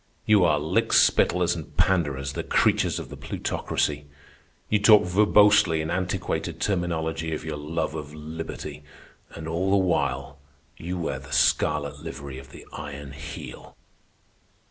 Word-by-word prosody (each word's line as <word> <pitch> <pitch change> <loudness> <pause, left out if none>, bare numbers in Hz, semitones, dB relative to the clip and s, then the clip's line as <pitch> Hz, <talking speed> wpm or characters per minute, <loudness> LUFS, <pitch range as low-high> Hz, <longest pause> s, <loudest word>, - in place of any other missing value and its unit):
You 105 -4 +5
are 80 -3 +3
lick 75 +1 0
spittlers 90 -1 +4
and 75 -3 -9
panderers, 75 -7 +1
the - - -3
creatures - - +2
of - - -6
the - - -8
Plutocracy. 75 -1 -2 0.6
You 105 - +2
talk 105 0 +7
verbosely 100 -2 +4
in 80 +1 -3
antiquated 90 +1 -2
terminology 80 -4 -1
of 75 - -7
your 75 -2 -4
love 75 +2 -3
of 75 -2 -6
liberty, 80 +2 -7 0.5
and 80 - -7
all 85 +4 -1
the 100 - +4
while 70 -7 -1 0.4
you 90 +2 -5
wear 85 - -3
the - - -13
scarlet 75 -2 +1
livery 70 -4 -7
of 65 -1 -13
the - - -13
Iron 75 -1 -7
Heel." 70 +2 -9
80 Hz, 145 wpm, -25 LUFS, 75-90 Hz, 0.6 s, talk